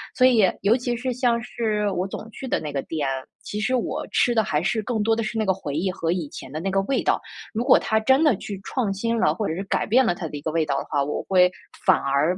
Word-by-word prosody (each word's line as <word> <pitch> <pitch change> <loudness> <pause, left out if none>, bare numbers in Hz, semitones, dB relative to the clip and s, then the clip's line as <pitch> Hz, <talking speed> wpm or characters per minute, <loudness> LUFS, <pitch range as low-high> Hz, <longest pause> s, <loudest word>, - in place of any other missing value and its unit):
所 255 - +6
以， 220 -7 +4
尤 205 +4 +4
其 245 -1 -2
是， 255 +1 -2
像 240 -2 +1
是 215 -3 -1
我 185 0 -1
总 220 +3 -7
去 265 - -8
的 - - 0
那 150 -2 -6
个 135 - -1
店， 150 -4 -2 0.4
其 210 - -5
实 255 +4 +1
我 245 - -2
吃 240 -1 +2
的 220 - +4
还 150 -4 0
是 195 +4 0
更 230 -2 -1
多 225 +1 +3
的 230 - -1
是 220 +1 -3
那 215 - +1
个 190 - +3
回 150 -7 -6
忆 180 +5 0
和 165 -2 -2
以 175 -4 -2
前 130 - -9
的 155 - -4
那 195 +3 -2
个 195 0 +2
味 275 - 0
道。 - - +1 0.3
如 230 +2 -1
果 250 - +6
它 220 - 0
真 265 +7 +4
的 285 -9 +5
去 200 -2 -6
创 225 -7 -1
新 230 +4 -1
了， - - +3
或 215 - -2
者 160 - -2
是 195 - -3
改 - - 0
变 250 +3 +4
了 175 - +2
它 175 -2 -5
的 150 - -8
一 - - -8
个 160 - -2
味 160 0 +1
道 140 -2 -1
的 - - -4
话， 145 - +1
我 150 +2 -3
会 180 -1 +5 0.4
反 185 - +6
而 140 +6 +1
205 Hz, 310 characters per minute, -24 LUFS, 170-235 Hz, 0.4 s, 所